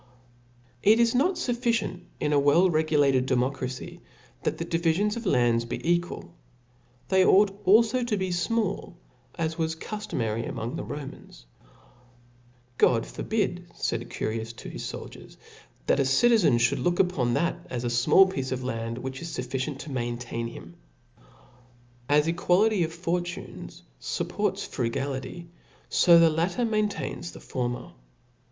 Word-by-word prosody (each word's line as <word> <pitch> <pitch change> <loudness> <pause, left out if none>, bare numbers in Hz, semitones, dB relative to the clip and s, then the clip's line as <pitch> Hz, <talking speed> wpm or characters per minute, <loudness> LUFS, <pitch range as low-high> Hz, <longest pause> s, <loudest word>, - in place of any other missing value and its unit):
TT 215 +2 +6
lis 235 -1 +3
ik>t 300 0 +1
fufficient 235 -6 -1 0.2
in 150 - 0
a 145 - +5
W«U*reguIat6d 150 -3 +3
demotracy* 130 0 -2
^ - - -27 0.4
that - - -1
the 165 - -3
dbifions 170 +5 +1
of 235 -3 -5
land 120 -5 +2
be - - -3
equal 175 0 -1 0.4
\ 120 0 -35
they 190 -1 +5
ought 200 +2 +5 0.2
alio 230 +5 +5
to 230 -3 -1
be 190 -1 -2
fmall^ 195 0 -1 0.4
as 160 0 -2
was 160 0 0
(cuftomary 120 - -3
ifirtiong 115 +2 -4
the - - -4
Ro 145 -1 -6
mans, 100 - -13 1.3
^^ - - -36
God 115 -2 +4
f^rbidy 190 -5 -2
faid - - -2
Curius 110 +1 -3
to - - -9
his - - -7
ibldiers - - -10
f, - - -21 0.2
that - - +2
a 135 - +3
citizen 180 - +4
Jhould 120 +1 +1
look 175 0 +1
upon 140 -11 +2
that 170 +3 -1
as 125 -1 -4
afinallpiece 130 +6 +3
of 130 -1 -2
hndy 115 -2 -3
which 130 +1 -6
isfufficient 135 -3 -4
to 145 - -8
maintain 120 -1 -3
him. 85 -7 -11 1.3
As 150 +1 +4
equality 180 +4 +2
of 160 - -2
fortunes 175 +2 -5 0.2
fupports - - -2
frugality, 135 +7 -4 0.4
fo 170 -2 +6
the 165 -1 +6
latter 175 +9 0
maintains 215 -5 -2
the - - -10
former. 120 -2 -4
160 Hz, 140 wpm, -27 LUFS, 125-190 Hz, 1.3 s, TT